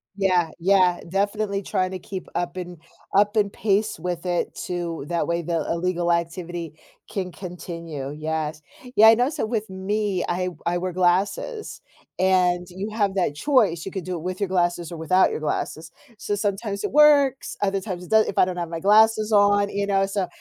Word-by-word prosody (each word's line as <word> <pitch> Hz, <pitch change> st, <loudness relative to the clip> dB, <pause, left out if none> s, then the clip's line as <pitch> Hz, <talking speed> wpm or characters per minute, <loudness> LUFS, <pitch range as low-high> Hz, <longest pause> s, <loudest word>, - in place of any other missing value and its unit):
Yeah, 185 Hz, -4 st, +2 dB
yeah. 185 Hz, 0 st, +3 dB
Definitely 200 Hz, +1 st, -1 dB
trying 185 Hz, -2 st, -1 dB
to 185 Hz, -, -5 dB
keep 190 Hz, 0 st, -7 dB
up 175 Hz, +1 st, -3 dB
and 180 Hz, -1 st, -6 dB, 0.4 s
up 205 Hz, +2 st, +4 dB
and 205 Hz, -2 st, +1 dB
pace 210 Hz, -2 st, 0 dB
with 175 Hz, +1 st, -4 dB
it 175 Hz, -1 st, -1 dB
too 170 Hz, -4 st, -4 dB
that 170 Hz, -1 st, 0 dB
way 170 Hz, 0 st, 0 dB
the 165 Hz, -1 st, -1 dB
illegal 175 Hz, 0 st, 0 dB
activity 170 Hz, -1 st, -3 dB, 0.4 s
can 185 Hz, -2 st, -3 dB
continue. 170 Hz, -6 st, -7 dB
Yes. 155 Hz, 0 st, -3 dB, 0.3 s
Yeah, 220 Hz, -, +8 dB
I 225 Hz, -, +8 dB
know 245 Hz, +3 st, +2 dB
so 295 Hz, -, -2 dB
with 220 Hz, -2 st, -3 dB
me, 190 Hz, 0 st, -1 dB
I 180 Hz, +1 st, -1 dB
w 180 Hz, -1 st, -5 dB
I 175 Hz, +1 st, +1 dB
wear 185 Hz, +1 st, -3 dB
glasses, 200 Hz, -, 0 dB, 0.4 s
and 180 Hz, -1 st, +2 dB
you 190 Hz, +4 st, -5 dB
have 205 Hz, -3 st, +1 dB
that 175 Hz, -7 st, 0 dB
choice. 205 Hz, -, +2 dB
You 195 Hz, -, -5 dB
could 190 Hz, -3 st, -5 dB
do 185 Hz, -, -3 dB
it 165 Hz, -, -6 dB
with 185 Hz, +1 st, -4 dB
your 200 Hz, -3 st, -1 dB
glasses 175 Hz, -2 st, 0 dB
or 170 Hz, -, -6 dB
without 170 Hz, +4 st, +3 dB
your -, -, -3 dB
glasses. 155 Hz, +1 st, -3 dB, 0.3 s
So 205 Hz, -, -3 dB
sometimes 205 Hz, 0 st, -2 dB
it -, -, -2 dB
works, 285 Hz, -2 st, +4 dB
other 195 Hz, -1 st, +1 dB
times 180 Hz, -3 st, -6 dB
it -, -, -15 dB
doe 220 Hz, 0 st, +6 dB
if -, -, -5 dB
I -, -, +6 dB
don't 180 Hz, -1 st, -4 dB
have 170 Hz, -2 st, -3 dB
my 165 Hz, -, -4 dB
glasses 215 Hz, +3 st, +4 dB
on, 205 Hz, -1 st, +4 dB
you 200 Hz, 0 st, -1 dB
know, 195 Hz, -1 st, +1 dB
so 195 Hz, -2 st, -2 dB
185 Hz, 195 wpm, -23 LUFS, 175-205 Hz, 0.4 s, Yeah